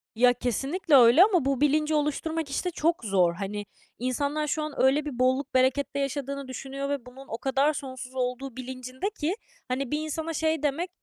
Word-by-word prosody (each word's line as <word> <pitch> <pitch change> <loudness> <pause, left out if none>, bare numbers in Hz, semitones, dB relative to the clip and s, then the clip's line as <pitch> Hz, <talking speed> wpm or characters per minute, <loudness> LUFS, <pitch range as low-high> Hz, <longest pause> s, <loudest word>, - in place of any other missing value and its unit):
Ya, 245 +2 +5
kesinlikle 275 - 0
öyle 255 +7 +8
ama 370 -9 +3
bu 275 0 0
bilinci 305 +1 +2
oluşturmak, 300 +1 -1
işte, 360 +6 -2
çok 335 -3 0
zor. 185 -4 +3
Hani, 205 +3 -4 0.3
insanlar 285 +4 -1
şu 305 +1 -1
an 305 -1 -4
öyle 275 +3 +3
bir 260 -5 -5
bolluk, 260 +2 +1
berekette 265 +2 +2
yaşadığını 280 0 -3
düşünüyor 275 +2 -5
ve 280 -4 -2
bunun 265 +2 -12
o 225 - -4
kadar 275 +4 +2
sonsuz 260 -2 -7
olduğu 250 0 -3
bilincindeki, 260 - -4 0.3
hani, 255 0 -2
bir 300 - 0
insana 315 +1 -3
şey 315 -1 0
demek, 310 +5 0
275 Hz, 175 wpm, -27 LUFS, 255-305 Hz, 0.3 s, öyle